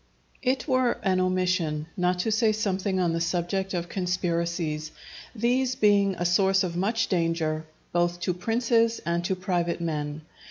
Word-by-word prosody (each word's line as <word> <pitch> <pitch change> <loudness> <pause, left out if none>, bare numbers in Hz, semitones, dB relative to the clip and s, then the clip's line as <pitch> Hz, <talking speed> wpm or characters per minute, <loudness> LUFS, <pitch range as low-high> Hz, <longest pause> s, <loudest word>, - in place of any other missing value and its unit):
_ - - -26
It 260 +2 0
were 255 -3 +3
an 185 -2 +2
omission 185 -4 0
not 180 0 +1
to 220 - -1
say 220 0 +3
something 195 -3 -1
on 175 -2 +1
the 165 - -1
subject 180 +3 -1
of 175 -1 -2
conspiracies, 170 -4 -2 0.4
these 250 +3 +1
being 200 -3 +3
a 175 - -3
source 190 +2 +3
of 175 -2 -3
much 210 +6 +1
danger 165 -3 -1 0.3
both 175 0 +1
to 180 - 0
princes 230 +4 +1
and 170 +1 0
to 190 - 0
private 180 -2 -1
men. 150 -2 -3
185 Hz, 160 wpm, -26 LUFS, 170-205 Hz, 0.4 s, were